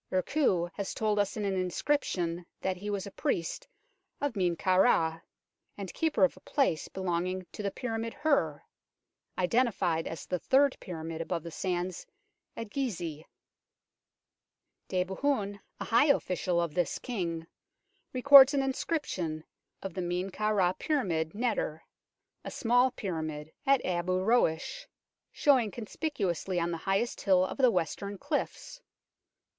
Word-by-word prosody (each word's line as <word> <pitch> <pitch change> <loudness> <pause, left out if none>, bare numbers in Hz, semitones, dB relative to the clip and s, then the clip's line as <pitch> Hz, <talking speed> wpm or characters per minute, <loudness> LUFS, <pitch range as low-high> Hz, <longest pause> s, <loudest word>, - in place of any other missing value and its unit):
Urkhuu 185 - +1
has 200 -2 -4
told 215 -1 +1
us 205 +2 0
in 210 - -2
an 195 - 0
inscription 180 - -1 0.2
that 190 -1 0
he 205 +3 -5
was 200 -2 -2
a 200 - -8
priest 180 - -2 0.5
of 285 -5 -1
Men 180 -3 +1
kau 185 +2 +2
Ra, 165 -6 +3 0.6
and 195 -3 -6
keeper 320 -3 +1
of 280 - +4
a - - -15
place 260 - 0
belonging 185 0 -2
to - - -7
the 200 - 0
pyramid 230 +1 -3
Her 275 - +1 0.7
identified 185 -5 +1
as 165 -3 -6
the 180 - -2
Third 275 +5 +3
Pyramid 165 -2 -6
above 165 -1 -3
the 170 - -7
sands 180 0 -3 0.5
at 225 -2 -6
Gizeh. 170 - -3 1.6
Debehen, 200 +3 -1 0.2
a - - -3
high 235 +6 +4
official 180 - +1
of 170 -3 -1
this 175 0 0
king, 170 -9 -3 0.7
records 275 +2 +8
an 275 - +2
inscription 255 - -2 0.4
of 195 -3 -5
the 185 - -3
Men 180 +2 -2
kau 215 +3 0
Ra 185 -4 +3
pyramid 185 - -1
Neter 375 - -1 0.6
a - - -5
small 245 +2 +3
pyramid 160 -9 -4 0.2
at 275 -1 +4
Abu 180 0 0
Roash, 225 - +1 0.4
showing 260 -7 +3
conspicuously 205 - -2
on 170 0 0
the 165 - -2
highest 200 +5 0
hill 185 -2 +4
of 190 - -6
the 255 -2 +6
western 200 +1 -2
cliffs. - - -3
190 Hz, 140 wpm, -30 LUFS, 175-245 Hz, 1.6 s, records